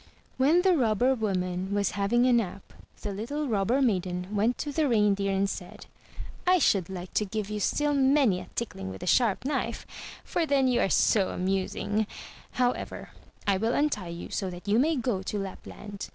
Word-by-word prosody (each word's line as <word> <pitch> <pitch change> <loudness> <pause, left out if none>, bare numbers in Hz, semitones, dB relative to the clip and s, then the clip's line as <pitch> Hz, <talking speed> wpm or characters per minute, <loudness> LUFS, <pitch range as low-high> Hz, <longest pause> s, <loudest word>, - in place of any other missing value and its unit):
*' - - -35
When 325 +7 +4
the 375 -2 +4
Robber 245 -1 +2
woman 190 -4 -2
was 205 0 +1
having 205 +6 +2
a 255 - +4
nap, 200 -5 -1 0.3
the 205 - -3
little 285 +9 -3
Rob 200 -5 0
ber 265 +4 +3
maiden 185 -3 -1
went 220 +5 +2
to 295 - -3
the 295 0 +1
Reindeer 205 -3 +2
and 195 +1 +1
said, 180 -2 -7 0.3
" - - -12
I - - +6
should 195 - +2
like 180 -1 -7
to - - +2
give 210 0 -4
you 210 - -2
still 295 +8 +1
many 270 -7 +3
a - - -9
tickling 95 - -4
with 95 0 -8
the - - -5
sharp 230 +3 +2
knife, 290 - -2 0.4
for 335 -2 -1
then 275 -2 +3
you 250 -1 +2
are - - +2
so 195 -1 +3
amusing; 195 +3 -1 0.5
however, 250 0 -2 0.3
I 200 -2 +2
will 225 +4 0
untie 285 -11 0
you 170 0 -7
so 190 - -2
that 180 +2 -10
you 210 +3 +3
may 315 +5 +3
go 240 -7 -1
to 200 +2 -4
Lapland. 200 +1 -7
210 Hz, 195 wpm, -28 LUFS, 190-255 Hz, 0.5 s, I